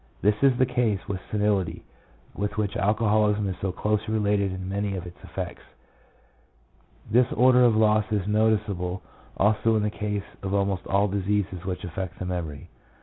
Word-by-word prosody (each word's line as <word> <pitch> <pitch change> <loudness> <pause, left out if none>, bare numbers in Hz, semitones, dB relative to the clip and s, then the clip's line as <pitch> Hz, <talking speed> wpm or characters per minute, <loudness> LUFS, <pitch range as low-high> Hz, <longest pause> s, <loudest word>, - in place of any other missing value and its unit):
This 105 +2 +5
is 135 -3 +4
the 130 - +4
case 120 -5 0
with 95 -2 -3
senility, 105 -4 0 0.5
with 105 +1 -3
which 105 -2 -1
alcoholism 105 0 +2
is 95 - -2
so 95 - -1
closely 105 +3 -1
related 100 -2 +1
in 95 0 -5
many 100 +1 -2
of 90 -1 -5
its 90 0 -12
effects. - - -6 1.5
This 120 +2 +4
order 125 +1 +5
of 120 -3 +5
loss 110 -1 +4
is 105 -3 0
noticeable 105 -4 0 0.3
also 110 +2 +3
in 105 - +1
the 105 - 0
case 105 -2 -3 0.2
of 95 0 -2
almost 100 -2 0
all 100 +1 +2
diseases 100 -2 -1
which 90 -1 -4
affect 90 +1 -5
the 90 - -5
memory. 85 -6 -4
105 Hz, 165 wpm, -26 LUFS, 95-110 Hz, 1.5 s, This